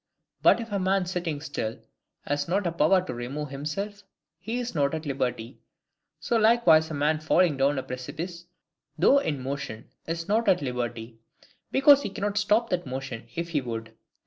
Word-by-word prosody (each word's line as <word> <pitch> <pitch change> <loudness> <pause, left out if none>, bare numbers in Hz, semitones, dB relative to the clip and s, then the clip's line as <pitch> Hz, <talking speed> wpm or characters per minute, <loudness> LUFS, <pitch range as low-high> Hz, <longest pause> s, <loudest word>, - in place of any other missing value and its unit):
But - - +5
if 230 -2 -6
a 200 - 0
man 190 0 +1
sitting 175 -5 -3
still 115 -7 -4 0.5
has 145 +2 -1
not 190 +3 0
a 170 - +1
power 175 +3 +3
to 125 - -4
remove 135 +5 -5
himself, 195 +9 -4 0.4
he 225 +7 -4
is 245 -1 -3
not 145 -2 +1
at 160 0 -5
liberty; 130 -3 -3 0.6
so 235 - 0
likewise 215 -9 +5
a 155 - -4
man 150 +2 +1
falling 155 +1 +3
down 140 +1 +2
a 130 - -2
precipice, 160 +8 -6 0.5
though 270 - +5
in 145 - -3
motion, 135 -4 -5 0.2
is 165 +1 -3
not 220 +1 +2
at 180 -2 +4
liberty, 120 -3 -4 0.5
because 280 +1 +6
he 240 - -3
cannot 205 +1 -2
stop 215 +3 +2
that 175 -4 -1
motion 130 -3 -6
if 170 0 -3
he 150 -4 0
would. 115 -2 -6
160 Hz, 175 wpm, -27 LUFS, 135-195 Hz, 0.6 s, because